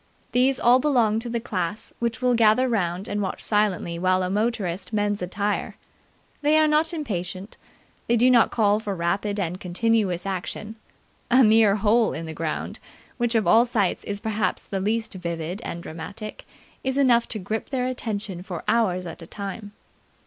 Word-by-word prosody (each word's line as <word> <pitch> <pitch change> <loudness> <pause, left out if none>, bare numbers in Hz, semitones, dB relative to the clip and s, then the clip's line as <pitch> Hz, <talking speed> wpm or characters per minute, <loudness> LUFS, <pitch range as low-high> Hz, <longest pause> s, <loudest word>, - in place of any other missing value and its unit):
These 255 +2 +3
all 245 +2 +5
belonged 235 -6 +2
to 240 - -3
the 235 0 -1
class 205 -1 -3
which 235 +1 -2
will 250 -1 +4
gather 230 +2 +4
round 190 -5 -1
and 205 - -2
watch 190 - -3
silently 200 -5 0
while 185 +1 +2
a 180 - -2
motorist 200 -4 -1
mends 205 -1 0
a 180 - -2
tyre. 205 +3 -2 0.7
They 300 +1 +4
are 310 0 +5
not 305 +2 +2
impatient. 195 - -5 0.5
They 235 - +3
do 250 +3 +5
not 235 -3 +5
call 210 -2 +2
for 205 -3 -4
rapid 195 +4 -1
and 180 -1 -2
continuous 190 -1 0
action. 195 +3 -4 0.5
A 255 +2 +6
mere 215 -2 +5
hole 215 +2 +2
in 165 - -5
the 160 - -6
ground, 155 0 -4 0.4
which 240 -1 0
of 220 - +2
all 230 +1 +6
sights 220 -6 0
is 205 0 -4
perhaps 215 -3 -1
the 195 - -3
least 220 +3 -1
vivid 170 +1 -4
and 170 0 -6
dramatic, 195 +7 -8 0.4
is 265 0 -1
enough 245 -4 +4
to 220 - -3
grip 215 +3 -4
their 255 -2 -1
attention 215 -7 -4
for 180 -2 -6
hours 210 -5 +1
at 170 0 -8
a 165 - -10
time. 205 +2 -7
210 Hz, 180 wpm, -24 LUFS, 185-235 Hz, 0.7 s, A